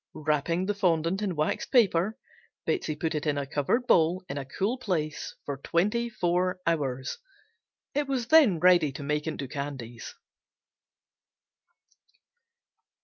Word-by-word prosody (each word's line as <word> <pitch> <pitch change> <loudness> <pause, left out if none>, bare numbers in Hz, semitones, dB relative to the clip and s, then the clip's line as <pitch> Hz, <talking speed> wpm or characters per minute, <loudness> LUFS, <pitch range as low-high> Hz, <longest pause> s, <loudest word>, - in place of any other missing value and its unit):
Wrapping 155 +4 0
the 205 - 0
fondant 175 -1 +1
in 195 -4 -1
waxed 150 0 -1
paper, 210 -4 +3 0.5
Betsey 160 - -1
put 160 +2 -2
it 150 0 -2
in 145 -1 +1
a 140 - -1
covered 145 - 0
bowl 180 -5 +3
in 140 - -5
a 135 - -6
cool 205 - -2
place 160 -10 -3
for 140 -1 -3
twenty 210 - 0
four 180 -3 0
hours. 140 - -1 0.7
It 290 0 0
was 260 -3 -1
then 280 - +6
ready 175 -4 +5
to 140 - -7
make 150 +2 -1
into 140 -3 -4
candies. 130 -4 -6
165 Hz, 135 wpm, -28 LUFS, 145-200 Hz, 0.7 s, then